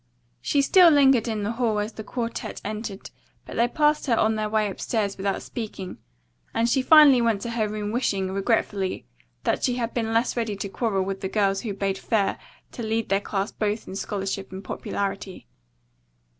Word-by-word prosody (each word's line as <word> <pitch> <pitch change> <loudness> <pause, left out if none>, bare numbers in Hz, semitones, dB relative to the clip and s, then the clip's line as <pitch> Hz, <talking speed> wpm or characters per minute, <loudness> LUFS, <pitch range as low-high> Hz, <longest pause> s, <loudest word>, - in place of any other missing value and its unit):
She 285 -1 +2
still 355 +4 +7
lingered 270 -6 +5
in 215 -2 -2
the 205 - -1
hall 230 -2 0
as 210 +1 -2
the 220 - -7
quartette 235 +1 -4
entered, 210 -1 -5 0.3
but - - -9
they 235 +1 +3
passed 300 +3 +1
her 235 -3 +3
on 220 0 +3
their 215 -1 -2
way 215 -1 +1
upstairs 200 +1 -2
without 195 0 -2
speaking 210 -5 -6 0.6
and 230 - +2
she 260 +3 +2
finally 285 -3 +7
went 225 -4 +1
to 235 - -3
her 220 -2 0
room 210 0 -3
wishing, 195 -6 0
regretfully, 195 -1 -1 0.4
that - - 0
she 250 - +2
had 235 -2 -2
been 225 -2 -1
less 230 +2 +1
ready 225 -3 -1
to 200 0 -5
quarrel 195 -2 0
with 195 0 -4
the 190 - -2
girls 195 -2 +1
who 210 -4 -4
bade 195 -1 -1
fair 205 -4 0 0.3
to - - -7
lead 225 0 -1
their 195 0 +2
class 200 0 -2
both 210 0 -2
in 190 - -7
scholarship 195 -1 -3
and 190 +1 -7
popularity. 195 0 -4
215 Hz, 190 wpm, -25 LUFS, 195-235 Hz, 0.6 s, still